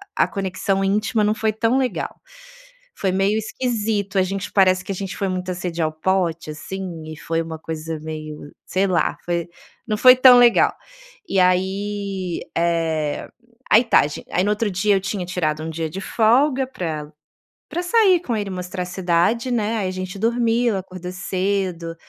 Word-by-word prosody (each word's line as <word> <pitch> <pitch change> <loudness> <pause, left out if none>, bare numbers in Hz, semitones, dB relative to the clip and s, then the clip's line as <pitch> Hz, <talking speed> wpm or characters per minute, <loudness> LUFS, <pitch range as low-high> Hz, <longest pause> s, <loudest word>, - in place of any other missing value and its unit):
a - - +3
conexão 195 0 -1
íntima 210 +3 +1
não 210 - +2
foi 220 0 0
tão 225 +4 +1
legal. 260 -2 -2 0.7
Foi 190 - -1
meio 195 +3 +1
esquisito 215 -3 -2
a - - +4
gente 195 +1 -4
parece 185 -2 +4
que - - -4
a - - -2
gente 195 0 -5
foi 195 - -1
muita 185 0 -3
sede 175 -2 -4
ao 155 - +1
pote, 170 -1 -1
assim, 175 +1 -6
e 155 - -7
foi 165 +1 -2
uma 165 -1 -6
coisa 160 0 -5
meio, 155 -1 -7
sei 190 +1 +1
lá, 180 -3 +1
foi 170 -1 -2 0.4
não 215 -2 0
foi 255 +3 +8
tão 255 -1 +8
legal. 240 -1 +5 0.6
E 195 - +2
aí, 190 0 0 0.2
eh, 165 -3 0 0.4
aí 220 +3 +7
tá 230 - +5
gi 145 - -7
aí 180 - +1
no 205 - +1
outro 210 +1 0
dia 200 +3 +2
eu 190 - +1
tinha 195 -1 -3
tirado 155 -4 -2
um 160 - -4
dia 160 0 -3
de 185 - -6
folga 255 +7 +2
pra 155 - -5 0.6
pra 350 - -3
sair 375 -1 +4
com 250 -9 -3
ele 205 -2 -2
e - - -5
mostrar 180 0 -4
a - - -8
cidade, 185 +6 +1
né, 225 -2 0
aí 195 -3 -1
a - - -3
gente 185 +1 -6
dormiu 235 0 +1
acordou 185 -1 -7
cedo, 185 -2 -2
190 Hz, 180 wpm, -21 LUFS, 170-215 Hz, 0.7 s, foi